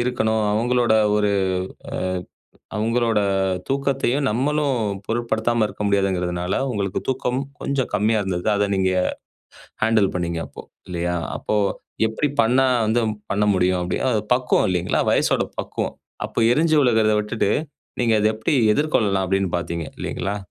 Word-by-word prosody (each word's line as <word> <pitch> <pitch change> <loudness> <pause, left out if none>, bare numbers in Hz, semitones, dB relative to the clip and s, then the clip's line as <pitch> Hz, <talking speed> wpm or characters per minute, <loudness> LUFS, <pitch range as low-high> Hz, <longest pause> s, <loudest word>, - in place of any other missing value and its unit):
இருக்கணும். 110 -3 0
அவுங்களோட 120 +1 +2 0.2
ஒரு 105 -1 +2 1.4
அ - - -2
அவுங்களோட 115 0 +1 0.5
தூக்கத்தையும் 135 0 0
நம்மளும் 140 +4 +1 0.3
பொருட்படுத்தாம 115 0 0
இருக்க 105 - -7
முடியாதுங்கிறதுனால, 90 -3 0 0.2
உங்களுக்கு 100 -4 -2
தூக்கம் 130 -1 0 0.2
கொஞ்சம் 140 -2 -1
கம்மியா 105 +2 +2
இருந்தது. 90 -2 -3
அத 100 0 +1
நீங்க 95 -1 +1 0.9
ஹாண்டில் 110 -3 +3
பண்ணீங்க 85 -2 -2
அப்போ, - - -11 0.2
இல்லயா! 90 0 -2 0.2
அப்போ, 105 - -1 0.5
எப்பிடி 125 +6 -1
பண்ணா 130 +4 +3 0.2
வந்து 115 +2 +2 0.3
பண்ண 105 +1 +1
முடியும்? 90 0 +2
அப்பிடி 90 0 -2
அது 110 - +1
பக்குவம் 125 0 +2
இல்லேங்களா! 90 -1 0
வயசோட - - +2
பக்குவம். - - -3 0.3
அப்போ - - -4
எரிஞ்சு 155 +2 +3
விழுறத 110 -4 +3
விட்டுட்டு, 105 -1 0 0.5
நீங்க 115 -2 +3
அத 105 - +3
எப்பிடி 110 +8 -1 0.2
எதிர்கொள்ளலாம் 105 -10 +1
அப்பிடீன்னு 95 -1 0
பாத்தீங்க. 85 -2 -4
இல்லேங்களா! 100 +3 -3
110 Hz, 130 wpm, -22 LUFS, 95-125 Hz, 1.4 s, ஹாண்டில்